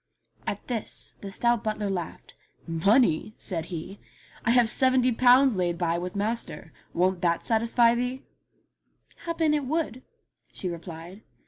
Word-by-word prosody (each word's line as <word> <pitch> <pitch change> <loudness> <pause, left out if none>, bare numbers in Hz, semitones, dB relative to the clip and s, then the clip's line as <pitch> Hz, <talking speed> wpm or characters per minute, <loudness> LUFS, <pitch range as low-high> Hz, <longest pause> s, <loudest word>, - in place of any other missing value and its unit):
At - - -4
this 235 -4 -4
the 200 - -6
stout 235 +3 0
butler 215 -1 -2
laughed. 180 -4 -5 0.3
"Money?" 195 +3 +2
said 165 -4 -1
he, 180 +3 -7 0.4
"I - - 0
have 240 -1 +5
seventy 255 +1 +4
pounds 250 +1 +5
laid 175 -2 -1
by 170 -1 0
with 180 +2 -6
master. 205 -7 -3 0.2
Won't 185 +1 +1
that 170 -1 0
satisfy 230 +1 +3
thee 250 +2 -3 0.5
?" - - -34
"Happen 330 -2 +1
it 295 -2 0
would," 300 -5 -2 0.5
she 185 - -5
replied. 170 +3 -9
215 Hz, 140 wpm, -26 LUFS, 175-245 Hz, 0.5 s, have